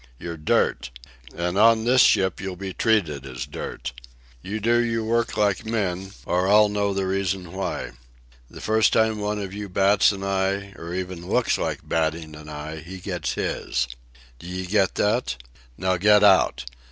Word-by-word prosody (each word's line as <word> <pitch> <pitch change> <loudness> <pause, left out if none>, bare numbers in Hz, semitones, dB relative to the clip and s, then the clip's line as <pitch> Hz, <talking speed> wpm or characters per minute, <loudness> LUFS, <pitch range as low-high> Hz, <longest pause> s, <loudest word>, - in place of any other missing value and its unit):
You're 85 +4 -6
dirt. 75 -5 0 0.5
And 90 +3 -1
on 115 0 +5
this 125 +1 +5
ship 95 -1 +3
you'll 95 -2 -4
be 95 +1 -6
treated 85 - +1
as 65 -2 -6
dirt. - - -6 0.5
You'll 105 +8 -4
do 120 +3 +3
your 115 -1 -1
work 115 +1 0
like 105 0 +1
men, 95 -4 -2
or 90 +1 +1
I'll 105 +1 +6
know 100 -1 0
the 95 -1 -1
reason 95 -2 -2
why. 95 0 -3 0.6
The - - -11
first 110 0 +3
time 110 -1 +2
one 105 0 -2
of 100 -2 -5
you 100 0 -6
bats 100 +3 +4
an 95 -1 -6
eye, 100 0 -1
or 85 +2 -7
even 90 -1 -5
looks - - +1
like - - -3
batting 80 -1 -1
an 75 0 -11
eye, 75 +1 -6
he 85 +5 -9
gets 90 -3 -3
his. 60 +1 -2 0.5
D'ye 90 +1 -5
get 95 0 +1
that? 105 - +1 0.4
Now 95 0 0
get 105 +3 +5
out. 100 -9 +4
95 Hz, 170 wpm, -24 LUFS, 90-105 Hz, 0.6 s, I'll